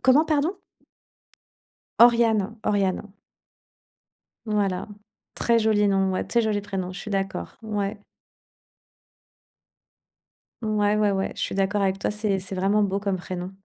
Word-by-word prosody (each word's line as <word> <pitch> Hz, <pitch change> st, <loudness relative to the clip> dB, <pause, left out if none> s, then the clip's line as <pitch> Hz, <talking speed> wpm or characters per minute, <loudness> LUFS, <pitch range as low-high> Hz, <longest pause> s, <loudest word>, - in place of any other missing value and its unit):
Comment? 260 Hz, +5 st, +5 dB
Pardon? 315 Hz, +5 st, 0 dB, 1.4 s
Oriane, 230 Hz, -3 st, +4 dB
Oriane. 195 Hz, 0 st, 0 dB, 1.3 s
Voilà, 205 Hz, -2 st, -1 dB, 0.5 s
très 230 Hz, -1 st, +2 dB
joli 215 Hz, -1 st, +3 dB
nom, 195 Hz, -1 st, +2 dB
ouais, 185 Hz, -, -1 dB
très 235 Hz, -, +2 dB
joli 210 Hz, -2 st, 0 dB
prénom, 190 Hz, -3 st, -4 dB
je 180 Hz, -, -8 dB
suis 210 Hz, -, -6 dB
d'accord. 195 Hz, -, -3 dB
Ouais. 205 Hz, -1 st, -3 dB, 2.6 s
Ouais, 210 Hz, -1 st, +1 dB
ouais, 210 Hz, -1 st, +3 dB
ouais, 195 Hz, 0 st, -1 dB
je -, -, -8 dB
suis -, -, -2 dB
d'accord 200 Hz, +1 st, +1 dB
avec 195 Hz, 0 st, +1 dB
toi, -, -, -1 dB
c'est 210 Hz, -2 st, -1 dB
c'est 190 Hz, +1 st, -7 dB
vraiment 195 Hz, +3 st, +2 dB
beau 195 Hz, 0 st, -1 dB
comme 200 Hz, -2 st, -1 dB
prénom. 180 Hz, 0 st, -6 dB
205 Hz, 130 wpm, -25 LUFS, 195-215 Hz, 2.6 s, Comment